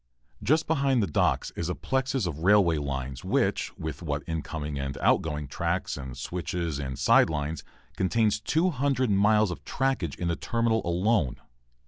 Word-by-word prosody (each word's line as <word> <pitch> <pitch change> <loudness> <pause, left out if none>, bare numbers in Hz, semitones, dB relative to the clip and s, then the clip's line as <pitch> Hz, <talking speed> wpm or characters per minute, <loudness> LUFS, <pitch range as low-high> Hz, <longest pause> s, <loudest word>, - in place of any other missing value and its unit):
Just 155 +10 +2
behind 140 -6 +2
the - - +2
docks 80 - +1
is 85 - -3
a 90 - -1
plexus 130 -3 -1
of 80 -4 -4
railway 90 -3 +4
lines 65 -2 -4
which, - - +1
what 80 -3 -5
with 70 -1 -2
incoming 75 -3 -4
and 70 0 -3
outgoing 75 -3 +1
tracks - - -2
and 65 -3 -7
switches 85 0 -3
and 65 -3 -4
side - - +5
lines, 75 +1 -3 0.3
contains 105 +2 +1
200 140 - +1
miles 105 0 +4
of - - -7
trackage 130 - -1
in 85 - -2
the 85 - +1
terminal 115 +1 0
alone. 90 - +1
90 Hz, 155 wpm, -27 LUFS, 75-115 Hz, 0.3 s, side